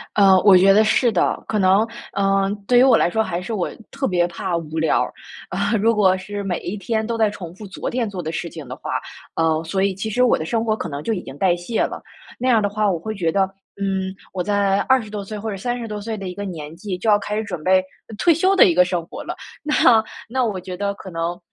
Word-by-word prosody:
呃， 195 -2 +6
我 195 -3 +8
觉 195 +2 +6
得 215 +2 +5
是 230 +2 +3
的， - - +1
可 215 - 0
能， 195 +4 +4 0.3
嗯， 195 0 +2
对 245 - +4
于 - - +7
我 260 -4 +6
来 - - +2
说 220 +4 +1
还 180 -3 -3
是 225 +5 -5
我 190 -5 -1 0.2
特 275 0 -2
别 175 -2 +2
怕 175 0 -3
无 160 -1 -6
聊 160 -1 +2
儿。 - - -3 0.4
啊， 200 +4 0
如 225 +2 +2
果 190 -3 +4
是 205 +2 -6
每 185 -3 -2
一 180 - -5
天 220 +2 -2
都 230 0 -2
在 220 -2 +3
重 175 -5 -8
复 210 - -10
昨 190 - -5
天 240 -3 -1
做 190 -3 -5
的 160 -1 -4
事 170 +1 -4
情 155 -4 -9
的 130 - -6
话， - - -7 0.4
呃， 160 -1 +1
所 190 +4 -1
以 195 -1 +1
其 200 +4 -4
实 245 +4 +2
我 250 - +4
的 - - -4
生 225 +6 -1
活 215 -1 +1
可 185 - -5
能 140 -1 -5
就 225 - 0
已 185 - -3
经 135 -3 -10
代 180 0 +3
谢 175 +7 -2
了， - - -4 0.4
那 255 - -1
样 230 -3 +4
的 205 - +1
话 210 0 +1
我 175 - -1
会 220 +6 -5
觉 165 -5 0
得， 195 - +2 0.4
嗯， 190 -1 -1 0.2
我 185 - -2
在 200 -1 +1
20 260 -5 +2
多 205 -1 -4
岁 210 +2 -7
或 220 +1 -4
者 200 - -3
30 240 +3 -3
多 210 -1 -5
岁 220 +1 -4
的 195 -2 -6
一 180 - -5
个 205 +2 -6
年 160 -5 -7
纪 185 +1 -5
就 200 - -5
要 205 - +6
开 205 +1 -4
始 220 - -1
准 180 -7 -6
备， 185 +2 +5 0.3
呃， 220 - -9
退 335 - +4
休 375 +5 +2
的 - - +8
一 175 - +3
个 180 +2 +6
生 175 -2 -2
活 - - -8
了， - - -5 0.3
那 300 0 0 0.5
那 255 +2 0
我 210 -5 -1
觉 180 0 -7
得 200 +2 -2
可 195 - -10
能， 170 +1 -3
195 Hz, 285 characters per minute, -21 LUFS, 180-220 Hz, 0.5 s, 我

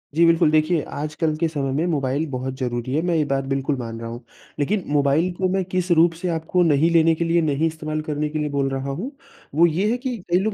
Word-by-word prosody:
जी 170 +1 +5
बिल्कुल, 165 -1 +4
देखिए, 155 +1 +2
आज 150 +1 -5
कल 160 -2 0
के 165 0 +1
समय 140 -4 -2
में 155 +5 0
मोबाइल 145 -1 0
बहुत 130 0 -3
ज़रूरी 120 0 -2
है, 160 - +2
मैं 175 -1 0
ये 155 - +3
बात 135 -1 -1
बिल्कुल 135 +1 0
मान 115 -2 -6
रहा 115 0 -6
हूँ। 120 +2 -8 0.4
लेकिन 190 +6 0
मोबाइल 145 +4 +2
को 185 +1 0
मैं 190 0 0
किस 185 -1 -2
रूप 165 0 +5
से 185 - -1
आपको 165 +2 +1
नहीं 160 +1 +3
लेने 165 -1 +5
के 170 - -1
लिए, 170 0 +2
नहीं 155 +1 +1
इस्तेमाल 155 -1 -4
करने 150 0 -1
के 155 0 -3
लिए 150 0 -1
बोल 135 -1 +1
रहा 135 +1 -3
हूँ। 200 - -4 0.4
वो 170 +2 +6
ये 185 +7 0
है 245 - 0
कि 250 -2 -4
कई 180 - +4
लोग 215 +1 -1
155 Hz, 255 wpm, -22 LUFS, 140-170 Hz, 0.4 s, वो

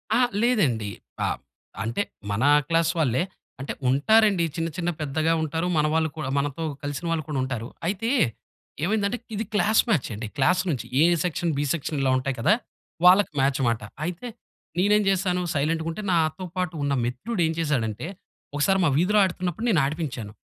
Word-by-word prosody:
అహా! 250 +1 +4 0.2
లేదండి. 140 - +2 0.4
ఆహ్, - - -1 0.5
అంటే 115 +1 -1 0.3
మన 100 +5 0 0.2
క్లాస్ 165 0 +2
వాళ్ళే. 130 -5 +2 0.4
అంటే 135 - -4 0.2
ఉంటారండి 200 - +4
చిన్న, 165 -1 -1
చిన్న 175 -1 -1
పెద్దగా 155 +3 +1
ఉంటారు. 160 +2 -1
మన 150 - +3
వాళ్ళు 160 0 +2
కూడా 150 -4 -3
మనతో 145 +3 -1 0.2
కలిసిన 145 +4 -4
వాళ్ళు 165 -1 0
కూడా 145 -3 -1
ఉంటారు. 125 -3 -4 0.2
అయితే 205 +5 -1 0.7
ఏమైందంటే, 205 +4 +1 0.2
ఇది 220 +2 -2
క్లాస్ 215 +1 +4
మ్యాచండి. 120 - -1
క్లాస్ 180 +7 +3
నుంచి 140 -7 -2 0.2
ఏ - - +7 0.2
సెక్షన్, 170 -1 -1
బి 145 - +1
సెక్షన్ 160 -1 -3
ఇలా 135 -1 +2
ఉంటాయి 130 +1 -2
కదా! 115 - +4 0.5
వాళ్ళకి 185 +2 +6
మ్యాచ్ 135 0 +2
మాట. 115 -1 0 0.2
అయితే 180 +8 -5 0.5
నేనేం 205 +3 +4
జేశాను 185 -1 +1
సైలెంట్‌గుంటే 160 +5 -1
నాతో 165 +2 +1
పాటు 180 -1 -1
ఉన్న 140 0 +1
మిత్రుడు 175 - -3
ఏం 160 - -1
చేశాడంటే, 130 -6 -1 0.5
ఒకసారి 190 +7 +2
మా - - +4
వీధిలో 195 +6 +3
ఆడుతున్నప్పుడు 185 +3 -2
నేను 170 -9 +4
ఆడిపించాను. 135 -8 -4
160 Hz, 160 wpm, -25 LUFS, 140-185 Hz, 0.7 s, ఏ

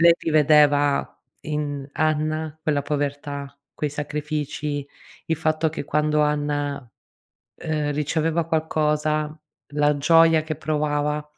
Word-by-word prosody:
...lei 170 0 +7
rivedeva 145 -2 +3 0.2
in 145 -2 -3
Anna 155 0 -1
quella 150 -2 +1
povertà, 145 -1 -3 0.2
quei 150 - -2
sacrifici; 150 0 -3 0.4
il 160 - 0
fatto 155 0 +1
che 155 -2 -5
quando 150 +1 +1
Anna, 145 -1 0 0.9
uhm, 150 -2 -1
riceveva 160 +3 0
qualcosa, 155 -1 0 0.4
la 150 0 +3
gioia 165 +2 +5
che 155 - -3
provava 150 0 -1
150 Hz, 105 wpm, -23 LUFS, 145-155 Hz, 0.9 s, lei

